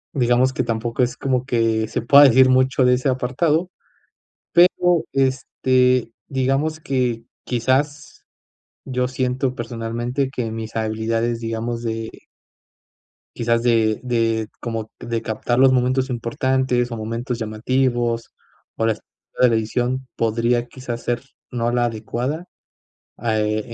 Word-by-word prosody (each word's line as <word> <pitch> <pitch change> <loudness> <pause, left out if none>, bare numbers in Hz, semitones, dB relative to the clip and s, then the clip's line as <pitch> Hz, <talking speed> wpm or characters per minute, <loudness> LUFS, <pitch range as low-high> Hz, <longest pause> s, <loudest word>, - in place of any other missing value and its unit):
digamos 125 0 +3
que 125 - 0
tampoco 115 +1 -2
es 125 0 0
como 130 -2 0
que 115 -3 +1
se 110 - -3
pueda 140 +4 +8
decir 130 0 +6
mucho 130 0 +3
de 125 - +5
ese 130 +2 +1
apartado, 150 +7 0 0.8
pero, 175 -1 +4
este, 130 -2 +1 0.2
digamos 135 +4 0
que 125 -5 -1 0.2
quizás 130 +5 -1 0.6
yo 125 -1 -1
siento 130 0 -1
personalmente 120 +2 -3
que 125 -4 -3
mis 110 0 -6
habilidades, 115 +1 -1
digamos 115 +1 -3
de 115 -1 -3 1.3
quizás 115 0 +1
de 110 -3 +2
de 115 -3 0
como 115 -2 -4
de 115 -1 -3
captar 110 +2 -1
los 130 0 +6
momentos 130 +1 +1
importantes 125 +1 0
o 115 - -4
momentos 115 +3 -4
llamativos 120 +1 -1 0.4
o 115 - 0
las 110 -2 0 0.4
de 125 - +7
la 115 - +2
edición 125 +4 -1
podría 115 +2 +1
quizás 120 -2 -6
ser 120 +1 -2 0.3
no 120 -1 -1
la 120 0 +2
adecuada, 120 +8 -3 0.7
ah, 110 -1 0
eh, 110 +1 -2
120 Hz, 130 wpm, -21 LUFS, 115-130 Hz, 1.3 s, pueda